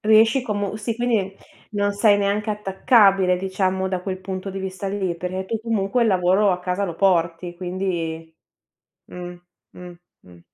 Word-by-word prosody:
Riesci 220 Hz, +4 st, +4 dB
comu 205 Hz, -3 st, -2 dB
sì, 220 Hz, +1 st, -3 dB
quindi 225 Hz, -5 st, 0 dB, 0.4 s
non 205 Hz, -1 st, 0 dB
sei 205 Hz, 0 st, +4 dB
neanche 205 Hz, +2 st, 0 dB
attaccabile 195 Hz, -2 st, +3 dB
diciamo 190 Hz, 0 st, -1 dB
da 185 Hz, -1 st, -3 dB
quel 185 Hz, 0 st, -4 dB
punto 190 Hz, +1 st, -5 dB
di 195 Hz, -, -5 dB
vista 190 Hz, +1 st, -5 dB
lì, 190 Hz, -3 st, -2 dB
perché 185 Hz, +2 st, -4 dB
tu 225 Hz, -, -2 dB
comunque 225 Hz, 0 st, 0 dB
il 230 Hz, -, +3 dB
lavoro 190 Hz, +1 st, +3 dB
a 180 Hz, -, -3 dB
casa 180 Hz, +2 st, -1 dB
lo 175 Hz, -4 st, -4 dB
porti, 175 Hz, -1 st, +1 dB
quindi 170 Hz, -3 st, -4 dB, 0.7 s
mh, 180 Hz, 0 st, -8 dB, 0.4 s
mh, 180 Hz, 0 st, -11 dB, 0.3 s
mh. 90 Hz, -1 st, -17 dB
190 Hz, 160 wpm, -22 LUFS, 180-205 Hz, 0.7 s, Riesci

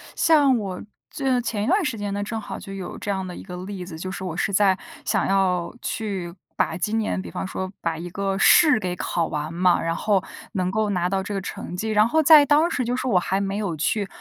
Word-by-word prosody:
像 290 Hz, -5 st, +4 dB
我 190 Hz, -3 st, -5 dB, 0.3 s
就 265 Hz, -3 st, 0 dB
前 220 Hz, -3 st, -2 dB
一 -, -, -2 dB
段 385 Hz, +3 st, +3 dB
时 260 Hz, -7 st, -2 dB
间 205 Hz, -1 st, -3 dB
呢， 205 Hz, 0 st, -2 dB
正 225 Hz, +2 st, -4 dB
好 -, -, -7 dB
就 195 Hz, -, -10 dB
有 190 Hz, -2 st, -6 dB
这 205 Hz, -, -6 dB
样 190 Hz, -1 st, -1 dB
的 180 Hz, -1 st, -7 dB
一 -, -, -8 dB
个 180 Hz, -2 st, -8 dB
例 195 Hz, -2 st, -6 dB
子。 175 Hz, -3 st, -8 dB
就 185 Hz, +3 st, -5 dB
是 190 Hz, -, -6 dB
我 175 Hz, -2 st, -4 dB
是 200 Hz, 0 st, -1 dB
在 195 Hz, -1 st, +4 dB, 0.3 s
想 -, -, +1 dB
要 185 Hz, -2 st, +1 dB
去 190 Hz, -6 st, -4 dB, 0.2 s
把 160 Hz, -, 0 dB
今 210 Hz, +5 st, -1 dB
年 210 Hz, -, -1 dB
比 85 Hz, -2 st, -9 dB
方 90 Hz, -, -4 dB
说 185 Hz, -, -4 dB
把 165 Hz, -1 st, -1 dB
一 175 Hz, +2 st, -6 dB
个 195 Hz, 0 st, -2 dB
试 300 Hz, -, +6 dB
给 180 Hz, -1 st, -2 dB
考 170 Hz, -1 st, -1 dB
完 150 Hz, +2 st, -4 dB
嘛， 180 Hz, 0 st, +3 dB
然 165 Hz, 0 st, -1 dB
后 200 Hz, -1 st, +1 dB, 0.3 s
能 185 Hz, -4 st, -1 dB
够 215 Hz, +1 st, 0 dB
拿 180 Hz, -2 st, 0 dB
到 190 Hz, -1 st, -1 dB
这 205 Hz, -, -5 dB
个 195 Hz, -, -2 dB
成 180 Hz, -, -6 dB
绩， 215 Hz, +5 st, -3 dB
然 215 Hz, 0 st, +4 dB
后 315 Hz, +6 st, +3 dB
在 305 Hz, -1 st, +8 dB
当 300 Hz, +4 st, +4 dB
时 250 Hz, -, -1 dB
就 245 Hz, +2 st, -1 dB
是 260 Hz, -, -3 dB
我 210 Hz, -7 st, +3 dB
还 190 Hz, +2 st, -1 dB
没 195 Hz, 0 st, -2 dB
有 200 Hz, -6 st, -2 dB
去 200 Hz, +6 st, 0 dB
195 Hz, 270 characters per minute, -23 LUFS, 180-220 Hz, 0.3 s, 在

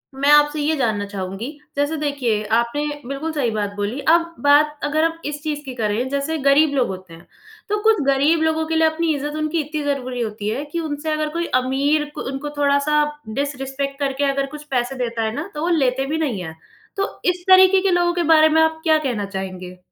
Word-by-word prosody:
मैं 280 Hz, +2 st, +1 dB
आपसे 295 Hz, 0 st, +5 dB
ये 310 Hz, +2 st, +1 dB
जानना 220 Hz, -6 st, 0 dB
चाहूँगी 195 Hz, +4 st, -5 dB, 0.3 s
जैसे 290 Hz, +2 st, 0 dB
देखिए 270 Hz, -8 st, -1 dB
आपने 235 Hz, +6 st, -1 dB, 0.2 s
बिल्कुल 275 Hz, +4 st, -3 dB
सही 275 Hz, -6 st, 0 dB
बात 210 Hz, -2 st, -2 dB
बोली 205 Hz, +6 st, -3 dB
अब 335 Hz, +1 st, +3 dB
बात 295 Hz, +1 st, +4 dB
अगर 310 Hz, +2 st, +1 dB
हम 330 Hz, 0 st, 0 dB
इस 290 Hz, 0 st, -4 dB
चीज़ 300 Hz, -2 st, -3 dB
की 260 Hz, -, -6 dB
करें 220 Hz, +2 st, -1 dB
जैसे 280 Hz, +3 st, -2 dB
गरीब 285 Hz, +1 st, +5 dB
लोग 260 Hz, -3 st, +2 dB
होते 185 Hz, -2 st, -8 dB
हैं। 165 Hz, +1 st, -15 dB, 0.4 s
तो 420 Hz, +1 st, 0 dB
कुछ 440 Hz, -5 st, +4 dB
गरीब 280 Hz, +4 st, +3 dB
लोगों 320 Hz, 0 st, +1 dB
के 325 Hz, -, -1 dB
लिए 320 Hz, 0 st, +4 dB
अपनी 315 Hz, 0 st, 0 dB
इज़्ज़त 295 Hz, +1 st, -4 dB
उनकी 310 Hz, +2 st, -1 dB
इतनी 300 Hz, +1 st, -4 dB
ज़रूरी 255 Hz, -3 st, -2 dB
होती 210 Hz, -2 st, -3 dB
है 270 Hz, +6 st, -2 dB
कि 340 Hz, -, -2 dB
उनसे 310 Hz, -1 st, -3 dB
अगर 305 Hz, 0 st, -1 dB
कोई 340 Hz, +2 st, -2 dB, 0.2 s
अमीर 280 Hz, +4 st, +1 dB
क -, -, -4 dB
उनको 275 Hz, +2 st, -5 dB
थोड़ा-सा 290 Hz, +1 st, +2 dB, 0.4 s
डिसरेस्पेक्ट 275 Hz, 0 st, -3 dB
करके 275 Hz, 0 st, -1 dB
अगर 275 Hz, 0 st, -1 dB
कुछ 300 Hz, -, -9 dB
पैसे 250 Hz, +1 st, -1 dB
देता 235 Hz, -3 st, -2 dB
है 220 Hz, -, -1 dB
ना 320 Hz, +7 st, -5 dB
तो 300 Hz, -, -4 dB
वो 340 Hz, -, 0 dB
लेते 265 Hz, -1 st, +1 dB
भी 305 Hz, +3 st, -2 dB
नहीं 270 Hz, -12 st, -2 dB
हैं। 160 Hz, -1 st, -7 dB, 0.4 s
तो 395 Hz, +1 st, -3 dB
इस 355 Hz, 0 st, -13 dB
तरीके 375 Hz, 0 st, +7 dB
के 385 Hz, 0 st, +1 dB
लोगों 350 Hz, 0 st, +2 dB
के 345 Hz, -1 st, 0 dB
बारे 315 Hz, 0 st, +6 dB
में 320 Hz, +1 st, +4 dB
आप 320 Hz, 0 st, +1 dB
क्या 315 Hz, -2 st, +4 dB
कहना 245 Hz, -8 st, -2 dB
चाहेंगे? 185 Hz, -2 st, -6 dB
285 Hz, 215 wpm, -21 LUFS, 250-315 Hz, 0.4 s, तरीके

